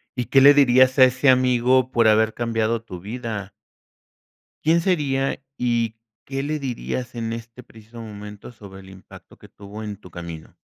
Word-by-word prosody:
¿Y 125 -2 -2
qué 135 - +4
le 140 +2 +8
dirías 130 -1 +4
a - - +9
ese 130 +2 +2
amigo 130 0 +3
por 115 -2 +3
haber 110 0 +3
cambiado 115 -1 -1
tu 90 -6 -9
vida? 110 -1 -6 1.1
¿Quién 165 +2 +3
sería 140 -7 0 0.2
y 115 -2 -1 0.3
qué 135 0 -4
le 150 +1 -3
dirías 125 -1 -5
en 115 -1 -4
este 115 +2 -10
preciso 110 +1 -14
momento 105 0 -10
sobre 100 -4 -13
el 95 - -15
impacto 95 -1 -15
que - - -17
tuvo 105 +2 -10
en 105 -2 -6
tu 90 - -15
camino? 85 -2 -9
115 Hz, 170 wpm, -22 LUFS, 105-130 Hz, 1.1 s, a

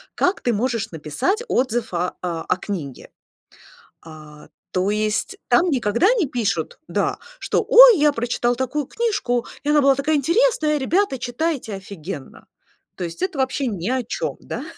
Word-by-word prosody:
как 365 - +1
ты 240 - 0
можешь 230 0 -1
написать 160 - -2
отзыв 240 - 0
о 175 +1 -1
о 175 0 -2
книге. 165 -11 -6 1.0
А, 155 -2 -13 0.2
то 185 +2 +1
есть 215 - -1
там 360 0 +4
никогда 250 - +1
не 410 -10 +1
пишут, 220 - -2
да, - - -1 0.2
что: - - 0
"Ой, - - +9
я 295 0 +4
прочитал 240 -1 0
такую 260 +3 -2
книжку, 255 - -1 0.2
и 295 - 0
она 295 -1 +4
была 275 0 +5
такая 285 +3 0
интересная, 315 - +2
ребята, 330 +1 +1
читайте, 245 -2 -2
офигенно". 185 -6 -8 0.5
То - - -6
есть 170 - -7
это 370 -6 -2
вообще 265 +1 0
ни 195 -3 -3
о 260 -1 0
чём, 485 - -3
да? - - -6
245 Hz, 155 wpm, -21 LUFS, 195-300 Hz, 1.0 s, Ой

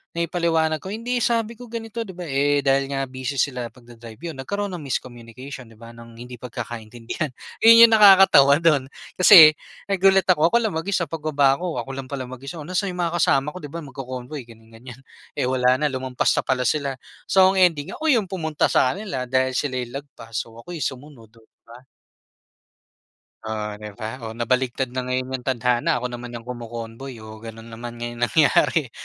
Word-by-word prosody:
naipaliwanag 165 -2 0
ko, - - -9
"Hindi, 235 +4 -2
sabi 230 -1 0
ko 245 - -10
ganito, 230 0 -6
'di 195 -5 -7
ba?", 180 - -7
eh, 145 -1 +1
dahil 135 0 +2
nga 135 -1 -2
busy 130 +1 -5
sila 125 -2 -1
pagda-drive, 120 -2 -14
'yon 165 -1 -7
nagkaroon 200 +8 -3
ng 175 - -6
miscommunication, 130 -1 -7
'di 115 - -17
ba, 115 +1 -12
ng 115 0 -14
hindi 125 0 -10
pagkakaintindihan. 120 +2 -6 0.3
'Yon 230 +1 +9
'yong 230 - +2
nakakatawa 190 -9 +7
do'n, 150 -5 +2 0.3
kasi 175 -4 +10 0.3
nagulat 195 -1 +3
ako, 165 -4 +4
ako 235 - +3
lang 220 - -1
mag-isa 170 +3 -1
pagbaba 145 -3 +1
'ko, 175 -2 -4
ako 135 - -9
lang 135 -1 -7
pala 140 -2 -4
mag-isa, 130 +5 -9
"Oh, 150 - -8
nasa'n 185 +4 -1
'yong - - -8
mga 170 -1 -2
kasama 150 -2 +2
ko, - - -8
'di 145 - -8
ba, 165 +3 -7
magko-convoy," 130 0 -7
ganyan-ganyan. 115 +2 -14 0.4
Eh, - - 0
wala 125 0 +2
na, 150 - -1
lumampas 130 -1 -1
na - - +1
pala 130 -1 -1
sila. 140 +1 0 0.3
So 190 0 +5
ang 190 - 0
ending, 160 -5 +2
ako 320 - -4
'yong 235 -8 +3
pumunta 160 -5 -1
sa 130 +3 +2
kanila 180 -12 -5
dahil 130 0 +1
sila 130 +1 -2
'yong 120 -1 -5
lagpas, 115 -5 -16
so 115 +1 -4
ako 145 +10 -10
'yong 155 -6 -1
sumunod, 130 -4 -11
oh, 115 - -21
'di - - -56
ba? 115 +1 -12 1.7
Oh, 110 -1 -4
'di 105 -1 -9
ba? 115 +3 -6
Oh, 110 -2 -7
nabaligtad 125 +1 -1
na 130 - -3
ngayon 130 0 -2
'yong 130 -1 -5
tadhana, 125 +5 +1
ako 125 0 -3
naman 120 0 -7
'yong 115 - -8
kumo-convoy, 120 +1 -8
oh, 110 0 -11
gano'n 115 +1 -11
naman 120 +1 -8
nga 120 - -8
'yong 120 0 -10
nangyari. 150 -2 +2
135 Hz, 195 wpm, -22 LUFS, 120-165 Hz, 1.7 s, kasi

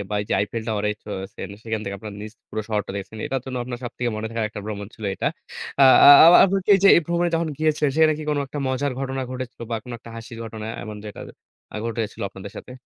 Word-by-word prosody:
বা 105 - -2
ওইযে 105 - -2
Eiffel 110 +3 -3
Towerএ 105 -1 0
চড়েছেন। 95 -1 -6
সেখান 110 -2 -3
থেকে 100 - -4
আপনার 105 +1 -8
নিচ 105 0 -8 0.2
পুরো 110 - -4
শহরটা 105 -2 -2
দেখেছেন। 100 +3 -7
এটার 135 - -2
জন্য 130 -1 -5
আপনার 120 -1 -6
সবথেকে 120 0 -3
মনে 110 +1 -3
থাকার 115 -1 -2
একটা 105 0 -8
ভ্রমণ 105 -1 -5
ছিল 110 - -10
এটা। - - -3 0.6
আ - - +10 0.2
আ - - +11 0.2
আপ 170 - +9
আপনি 195 0 +1
কি - - 0
এইযে 200 +1 +5
এই - - +5
ভ্রমণে 170 0 +1
যখন 165 0 0
গিয়েছিলেন 155 -2 +1
সেখানে 160 -1 +5
কি 155 - -6
কোনো 145 -1 0
একটা 145 +2 -7
মজার 130 +1 -1
ঘটনা 135 0 -3
ঘটেছিল? 130 -1 -7
বা 115 - 0
কোনো 125 - -7
একটা 115 - -13
হাসির 115 0 -9
ঘটনা 110 -1 -7 0.2
এমন 110 -1 -7
যেটা 105 - -8 0.5
আ - - -3
ঘটেছিল 115 -2 -4
আপনাদের 95 +1 -10
সাথে? - - -9
115 Hz, 235 wpm, -23 LUFS, 105-135 Hz, 0.6 s, আ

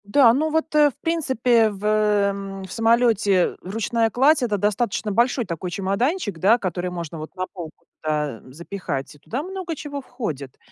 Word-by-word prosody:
Да, 230 +3 +5
ну 305 +5 +1
вот, 320 0 -1
э, 300 -1 +6
в 270 - -14
принципе, 250 -8 +2
в, 200 -1 -9
м, 200 -2 +1
в 190 - -10
самолете 225 -5 +3
ручная 225 +4 0
кладь- 275 +7 +4
это 210 -4 0
достаточно 210 +1 0
большой 240 +3 +2
такой 180 0 -4
чемоданчик, 200 - -1
да, 210 +7 +5
который 180 -4 -3
можно 170 -2 -6
вот 155 +4 -9
на 185 0 -2
полку, 170 -5 -10 0.2
да, 150 -6 -1
запихать, 155 -1 -5
и 150 - -19
туда 250 - -4
много 370 -2 -5
чего 285 -1 -6
входит 155 - -6
210 Hz, 170 wpm, -23 LUFS, 185-245 Hz, 0.2 s, э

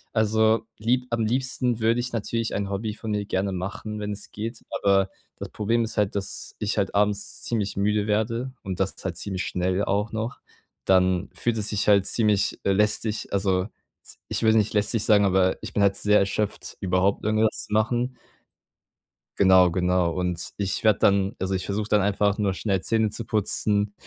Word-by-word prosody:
Also, 110 0 +2
lieb 125 +3 0
am 115 -1 0
liebsten 125 0 0
würde 115 +2 +2
ich 125 +1 -3
natürlich 115 +1 -2
ein 100 0 -2
Hobby 105 +2 -3
von 110 0 -6
mir 105 -1 -1
gerne 95 0 -1
machen, 100 +3 -5
wenn 105 0 -3
es 100 0 -7
geht, 110 +2 -6
aber 95 -1 +2 0.3
das - - -7
Problem 115 +3 0
ist 110 0 -5
halt, 105 -2 +1
dass 100 -1 -3
ich 105 +1 -2
halt 100 -2 -1
abends 100 0 0
ziemlich 105 -5 -2
müde 105 +1 +1
werde 115 +4 -1
und 95 -2 -5
dass 95 0 -1
es - - -11
halt 90 -3 -2
ziemlich 95 0 -3
schnell 90 +2 -1
auch 100 +2 -1
noch, 110 +2 -4 0.5
dann 95 0 +2
fühlt 120 -1 -1
es 105 0 0
sich 105 - -1
halt 100 -2 +5
ziemlich, 105 -3 +1
äh, 100 - +2
lästig, 105 +2 +1
also, 95 -1 +1 0.4
z - - -7
ich - - -2
würde 110 0 +5
nicht 110 0 +1
lästig 105 +1 +1
sagen, 105 -2 +4
aber 95 -1 +2
ich - - -7
bin 105 - +2
halt 100 -1 +3
sehr 105 0 +4
erschöpft, 100 +1 -2
überhaupt 95 +1 +1
irgendwas 110 +1 +1
zu - - -6
machen. 120 +4 0 1.2
Genau, 95 -2 +6
genau. 90 0 +1
Und 90 -1 -2
ich 100 -2 -2
werde 110 -2 +4
dann 100 +2 +2
also, 95 +1 -2
ich 95 -1 -1
versuche 105 +1 -2
dann 105 -1 +3
einfach 100 +1 +1
nur 100 -2 +1
schnell 95 -3 -1
Zähne 110 -1 +1
zu 115 - -4
putzen, 105 -1 0
105 Hz, 190 wpm, -25 LUFS, 95-110 Hz, 1.2 s, Genau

